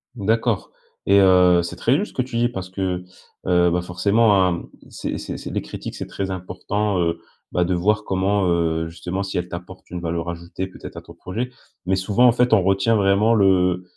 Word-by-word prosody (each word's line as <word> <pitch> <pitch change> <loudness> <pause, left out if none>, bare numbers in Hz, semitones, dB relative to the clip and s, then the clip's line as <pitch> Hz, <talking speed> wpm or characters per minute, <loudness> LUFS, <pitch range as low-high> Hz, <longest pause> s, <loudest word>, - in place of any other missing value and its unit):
D'accord 115 0 0 0.4
et, 100 0 +5
heu, 90 -2 +5
c'est 85 0 -6
très 120 +9 +2
juste 210 - -2
ce - - -23
que - - 0
tu 125 -2 -4
dis 120 - +3
parce 95 -6 -6
que, 95 -1 -3 0.4
heu, 90 -1 +3
bah, 90 +1 +1
forcément, 100 +2 +3
hein, 85 -1 -1 0.3
c’est - - -4
c’est - - -6
c’est - - -7
des - - -2
critiques, - - -7
c'est - - -6
très 95 -1 -4
important, 95 +3 -2
heu, 85 -1 0 0.3
bah, 90 - +1
de 90 - 0
voir 105 +4 +1
comment, 95 +1 +1
heu 80 -1 0
justement, 90 +3 -5
si 100 -2 -3
elles 90 0 -3
t'apportent 90 +2 -9
une 90 0 -5
valeur 85 0 -3
ajoutée, 85 +2 -5
peut-être, 95 - -11
à - - -7
ton - - -14
projet. 120 +7 -5 0.4
Mais 95 +1 +1
souvent, 100 +6 +2
en 125 - +7
fait, 125 0 +2
on 100 - +6
retient 95 +4 +2
vraiment 100 +2 +3
le, 90 -3 +3
95 Hz, 210 wpm, -22 LUFS, 90-105 Hz, 0.4 s, en